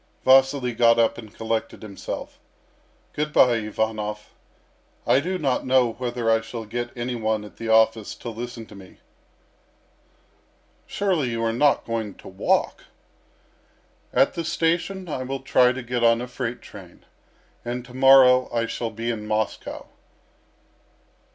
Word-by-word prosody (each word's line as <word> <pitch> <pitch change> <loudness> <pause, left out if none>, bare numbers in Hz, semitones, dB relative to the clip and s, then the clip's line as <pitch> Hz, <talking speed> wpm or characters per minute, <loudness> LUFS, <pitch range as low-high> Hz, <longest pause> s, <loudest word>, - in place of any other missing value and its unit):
Vasily 135 -1 +4
got 115 0 +4
up 115 0 +2
and 110 -3 -11
collected 110 0 -4
himself. 100 -3 -7 0.7
"Good 150 0 -2
bye, 125 -5 +5
Ivanov. 105 -1 -3 0.7
I 130 - +4
do 185 +6 -2
not 135 -7 0
know 130 -2 +2
whether 120 -1 -4
I 115 0 +3
shall 115 0 -7
get 120 +3 -4
any 120 +1 -3
one 110 -2 -1
at 105 - -14
the 115 - -6
office 110 -1 +2
to 120 - -7
listen 120 0 -7
to - - -15
me." 95 -2 -14 1.9
"Surely 180 -10 0
you 115 -1 -3
are 115 0 0
not 145 +4 +2
going 110 -4 -4
to - - -14
walk?" 95 0 -1 1.3
"At 135 - +3
the 170 - -4
station 170 +3 -1
I 145 -5 -4
will 135 +1 -4
try 125 -2 +4
to 130 0 -6
get 120 0 -2
on 115 0 +4
a 125 - -5
freight 125 -1 -5
train, 90 -4 -14 0.6
and 120 +1 -5
to 125 - -14
morrow 130 -1 +6
I 115 -1 0
shall 115 0 -4
be 115 +2 -3
in 105 -2 -6
Moscow." 110 0 -3
120 Hz, 150 wpm, -23 LUFS, 110-130 Hz, 1.9 s, morrow